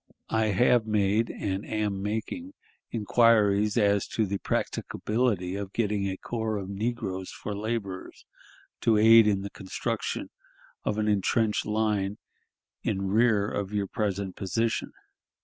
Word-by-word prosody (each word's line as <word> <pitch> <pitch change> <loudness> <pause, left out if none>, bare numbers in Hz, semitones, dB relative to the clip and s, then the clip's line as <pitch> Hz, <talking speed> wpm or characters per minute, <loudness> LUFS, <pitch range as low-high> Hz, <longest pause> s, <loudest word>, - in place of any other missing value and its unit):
I 110 -1 +2
have 115 +3 +3
made 105 +1 +2
and 95 0 -3
am 105 -3 -2
making 185 - -4 0.3
inquiries 105 -2 +3
as 100 -2 +3
to 110 - 0
the 100 0 -3
practicability 105 -5 -1
of 100 -1 -5
getting 105 -3 0
a 95 - -4
corps 110 -1 -3
of 95 -1 -5
negroes 100 -3 -3
for 105 - -6
laborers 105 -3 -4 0.5
to 110 -2 +3
aid 110 +1 +7
in 100 -2 +2
the 100 - -6
construction 95 - -4 0.5
of 105 - -1
an 105 0 0
intrenched 105 +2 +1
line 105 -2 0 0.6
in 95 0 -1
rear 110 -2 +3
of 100 -1 -3
your 100 -1 0
present 100 -2 -2
position. 115 +4 -1
105 Hz, 130 wpm, -27 LUFS, 100-110 Hz, 0.6 s, aid